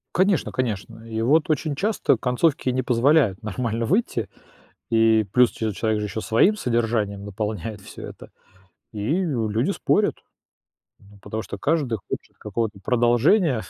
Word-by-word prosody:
Конечно, 190 -2 +2
конечно. 115 -2 -3
И 110 -1 -3
вот 150 +7 +3
очень 155 0 0
часто 195 - +1
концовки 130 +3 +1
не 130 +1 0
позволяют 125 - +3
нормально 115 +2 -2
выйти, 175 - 0 0.6
и 110 -1 +4
плюс 125 -1 +5
че 110 -1 -3
человек 110 0 0
же 105 - -2
ещё 110 +2 -4
своим 180 - +3
содержанием 115 - -1
наполняет 105 0 -4
всё - - -11
это, - - -12 0.6
и 115 - -1
люди 115 -8 0
спорят, - - +1 0.8
ну 100 0 -19
потому 110 +2 -5
что - - -7
каждый 140 -8 0
хочет - - -6
какого-то 105 0 -3
продолжения, 120 - +3
115 Hz, 140 wpm, -23 LUFS, 110-140 Hz, 0.8 s, плюс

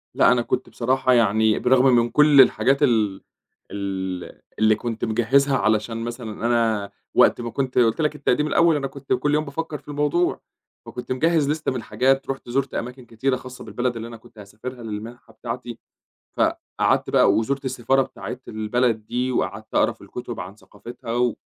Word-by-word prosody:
لأ، - - +5
أنا 125 -1 +3
كُنت 125 - -2
بصراحة 130 +1 +1
يعني 110 -2 +3
بالرغم 130 +1 +3
من 120 0 +3
كل 150 +1 +6
الحاجات 135 +2 +3
ال 110 -7 +2 0.5
ال 95 -2 -5 0.2
اللي 110 0 +4
كُنت 115 0 -4
مجهزها 135 +5 +2
علشان 110 +1 0
مثلًا 115 -2 -5
أنا، 115 -4 +1 0.2
وقت - - +4
ما 115 - -4
كُنت 130 0 -3
قُلت 120 +3 +3
لك 150 -1 0
التقديم 150 +1 +1
الأول 165 +1 +3
أنا 135 -2 -1
كُنت 140 0 -4
كل 145 +4 0
يوم 155 +1 +1
بافكّر 155 +2 -5
في - - -24
الموضوع، 150 +4 0 0.4
فكُنت 125 +1 -8
مجهّز 155 +2 +2
لسته 155 -1 -1
من 130 - -3
الحاجات 130 +5 0
رُحت 135 -2 -5
زُرت 135 +1 -1
أماكن 125 +1 -5
كتيرة 130 +4 -1
خاصة 125 0 -9
بالبلد 125 0 -2
اللي 115 0 -6
أنا 115 -1 -9
كُنت 115 0 -21
هاسافرها 115 +5 -9
للمنحة 110 +3 -8
بتاعتي، 120 0 -6 0.6
فقعدت - - 0
بقى 100 - +4
وزُرت 135 +6 -1
السفارة 130 +1 +1
بتاعة - - -7
البلد 110 0 -1
دي 125 +1 -1
وقعدت - - -3
أقرا - - +3
في - - -23
الكتب - - -7
عن 95 +3 -8
ثقافتها 115 +4 -10
و، 120 -1 +1
120 Hz, 175 wpm, -23 LUFS, 110-135 Hz, 0.6 s, كل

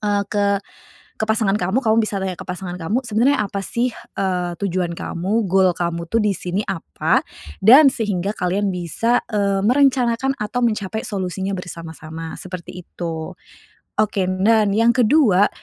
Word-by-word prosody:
eee, 205 -1 +1
ke 200 -1 +2 0.6
ke 220 - -1
pasangan 215 -2 +2
kamu, 190 +7 0
kamu 220 -2 +2
bisa 210 -2 -2
tanya 185 -2 -3
ke - - -9
pasangan 180 0 -5
kamu 200 +9 -1
sebenarnya 230 +5 +2
apa 200 -1 -3
sih, 240 +2 0 0.3
eee, 180 -2 -1
tujuan 180 -3 -1
kamu, 195 +7 -2
gol 190 -1 +4
kamu 170 -1 -3
tuh 230 +3 +2
di 210 -1 +2
sini 180 +3 -2
apa 165 - 0 0.4
dan 275 +6 +9
sehingga 205 -4 -2
kalian 190 +3 0
bisa, 185 +7 0
eee, 200 -2 +1
merencanakan 265 0 +2
atau 210 +4 -3
mencapai 220 -2 -1
solusinya 190 -2 -3
bersama-sama, 165 -2 -8
seperti 185 -1 -8
itu. 165 -2 -5 0.6
Oke, 205 -3 +1
nan 200 +2 +3
yang 230 +1 +4
ke-2, 225 -6 +4
200 Hz, 150 wpm, -20 LUFS, 180-225 Hz, 0.6 s, dan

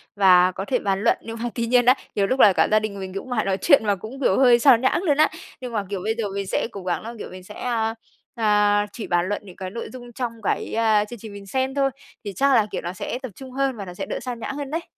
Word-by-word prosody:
và 185 -2 +6
có 190 +2 -5
thể 250 +3 0
bàn 195 -1 -1
luận. 230 - +3
Nhưng 225 0 -7
mà 240 - -1
tuy 235 - -1
nhiên 245 +1 +3
đấy, 255 +2 +6 0.2
nhiều 200 -1 +2
lúc 260 +4 -1
là 205 - +7
cả - - +3
gia 215 - +5
đình 210 -2 -5
mình 190 -1 -6
cũng 195 +6 -6
mải 240 -3 0
nói 195 -1 0
chuyện 280 -8 +5
mà 205 -1 +2
cũng, 220 +8 -9
kiểu, 195 - +3
hơi 245 -3 +6
sao 260 -1 +7
nhãng 260 +8 +1
luôn 295 -6 +2
á. 310 - +5 0.3
Nhưng 250 -1 -6
mà, 210 -2 0
kiểu, 200 -2 -3
bây 220 +1 0
giờ 230 - -1
mình 200 -1 -3
sẽ - - -1
cố 200 -3 -8
gắng 180 -1 -1
là, 230 +2 -7
kiểu, - - -7
mình 185 0 -11
sẽ, - - -11
a, 225 -2 -1 0.4
a, 210 -2 +3
chỉ 220 - -7
bàn 175 0 +1
luận 205 - -2
những 185 -3 -12
cái 185 -1 -6
nội 230 +4 -6
dung 245 -1 -10
trong 245 0 -3
cái, - - -1
a, 220 -2 +3
chương 235 +2 -10
trình 215 -1 -9
mình 200 0 -10
xem 260 +5 -1
thôi, 275 -1 +2 0.4
thì 200 - -4
chắc 275 0 +3
là, 220 -3 +4
kiểu, - - -3
nó 175 +1 -5
sẽ 215 +6 -4
tập 260 -4 -6
trung 265 +2 -10
hơn 270 0 0
và 200 - -6
nó 180 - -8
sẽ - - -5
đỡ - - -4
sao 250 0 -5
nhãng 230 +4 -5
hơn 285 -1 -5
đấy. 330 +2 -2
220 Hz, 305 wpm, -23 LUFS, 200-250 Hz, 0.4 s, là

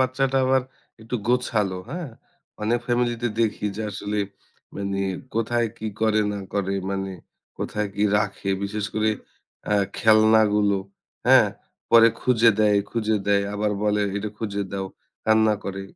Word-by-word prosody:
বাচ্চাটা 130 +1 +1
আবার 130 0 +3 0.4
একটু 115 +3 -3
গোছালো, 110 -6 +1
হ্যাঁ? 170 -2 -5 0.5
অনেক 115 +3 +1
ফ্যামিলিতে 120 -1 0
দেখি 105 -2 0
যে, 110 - -3
আসলে 105 +1 -3 0.6
মানে 100 0 -2 0.3
কোথায় 115 +1 +1
কি 110 - -5 0.2
করে 110 -1 +3
না 100 - -4
করে, 100 -1 0 0.2
মানে 95 0 -2 0.5
কোথায় 105 -1 -2
কি 105 - +2
রাখে 105 -1 -2
বিশেষ 105 +1 -3
করে 110 0 +2 0.6
আ - - +4 0.2
খেলনাগুলো, 110 -2 +4 0.5
হ্যাঁ? - - +7 0.4
পরে 115 0 +8
খুঁজে 115 -2 +5
দেয়, 105 -1 +4
খুঁজে 110 -2 0
দেয় 100 -1 +3
আবার 105 0 0
বলে, 105 0 +2
"এটা 105 +1 -3
খুঁজে 100 -2 -2
দাও।" 95 -1 -3 0.4
কান্না 110 -1 +4
করে। 95 0 -4
110 Hz, 140 wpm, -24 LUFS, 100-115 Hz, 0.6 s, পরে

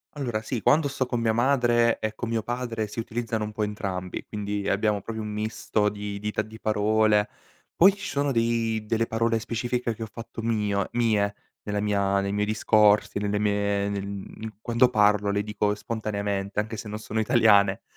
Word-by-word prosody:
Allora, 120 -6 -2
sì. 120 +1 -3
Quando 145 +4 +3
sto 130 -2 -2
con 120 -2 -2
mia 110 -1 +2
madre 120 -1 +3
e 110 0 -2
con 120 - -4
mio 115 -1 -1
padre 120 -3 -3
si 105 - -10
utilizzano 115 -1 -2
un 105 - -6
po' 105 0 -3
entrambi, 95 -3 -4
quindi 105 -1 -3
abbiamo 105 0 +1
proprio 110 +1 -5
un 105 - -5
misto 105 0 -1
di 105 0 -5
dita 105 +1 -2
di 110 +1 -12
parole. 110 0 +2 0.5
Poi 190 +3 +7
ci 200 - -7
sono 140 0 0
dei 115 -2 0
delle 115 +1 +1
parole 115 0 +1
specifiche 120 +1 -2
che 115 - -9
ho 110 - -4
fatto 115 -1 -8
mio 105 -4 0
mie 110 -4 +2 0.3
nella 105 0 -3
mia 100 -1 +1
nei 100 0 -1
miei 105 0 +1
discorsi, 105 -1 +3
nelle 105 0 0
mie 100 -1 0
nel 100 -1 -3
mhmm, 100 +1 -7
quando 120 +2 +3
parlo 105 -3 +3
le 100 0 0
dico 105 -1 0
spontaneamente 100 -3 -3
anche 110 +2 -1
se 105 - -7
non 105 +1 -5
sono 110 0 -3
italiane. 105 -3 +4
110 Hz, 185 wpm, -26 LUFS, 105-115 Hz, 0.5 s, Poi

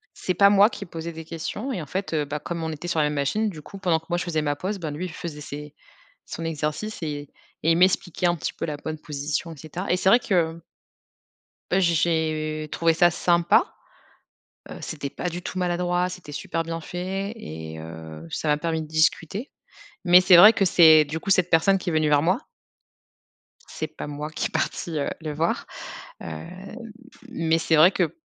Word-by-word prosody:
C'est 185 - -2
pas 200 +2 +6
moi 205 +1 +6
qui 200 - -7
posais 165 0 -6
des 160 0 -8
questions 170 - -5
et 185 - -3
en 150 - -8
fait, 190 +3 -4
heu, 150 -2 +1
bah, 145 +1 -4
comme 170 +1 -5
on 160 - -2
était 155 +3 -7
sur 170 -2 -1
la 150 - +4
même 150 - -1
machine, 205 +10 0
du 155 -5 -10
coup 195 - -11
pendant 175 -4 +2
que 160 - -26
moi 175 0 0
je - - -2
faisais 160 -3 -1
ma 145 -1 -1
pause, 195 +6 -3
ben, 160 -4 -4
lui 150 +5 -4
il 170 - -8
faisait 155 -4 -7
ses 150 0 -8 0.5
son 165 - -6
exercice 160 +7 -3
et 145 -2 -4 0.3
et 165 - +5
il - - +2
m'expliquait 180 0 +2
un 175 0 +2
petit - - -3
peu - - -4
la 150 -2 -3
bonne 155 +1 -6
position 150 +3 -4
et 160 - -11
cetera. 160 +6 -6
Et 180 - +4
c'est 185 - +1
vrai 235 +5 +6
que 170 -6 0 1.1
heu, 190 - +4
j'ai 170 -2 +3
j'ai 155 -2 0
trouvé 165 -1 +2
ça 175 +2 +5
sympa. 170 +1 +2 1.0
Heu, - - -7
c'était 145 -3 -5
pas 180 - -4
du 175 +1 -5
tout 185 - -5
maladroit, 180 0 0
c'était 180 -5 -9
super 165 +3 -3
bien 165 0 -5
fait 190 +4 -4
et 80 - -8
heu, 80 0 -9
ça 155 - -3
m'a 150 - +4
permis 160 0 -1
de 155 - -8
discuter. 160 - 0 0.5
Mais 180 0 +7
c'est 185 0 +7
vrai 210 +6 +10
que 195 - +2
c'est, 160 -4 +7
du 155 +3 -4
coup, 195 - -6
cette 185 -2 +3
personne 175 +4 +4
qui 185 - -4
est 165 - -2
venue 155 -1 +2
vers 145 -1 +4
moi. 185 - 0 1.2
C'est 155 - -5
pas 155 - -8
moi 150 +1 -5
qui - - -2
est - - -5
partie, 160 -3 -2
heu, 140 - -1
le 155 -2 -4
voir, 160 +3 -1 0.6
heu, - - -7 1.0
mais 165 -9 +1
c'est 160 0 +2
vrai 160 +4 +7
que 180 -4 -1
165 Hz, 215 wpm, -24 LUFS, 155-180 Hz, 1.2 s, vrai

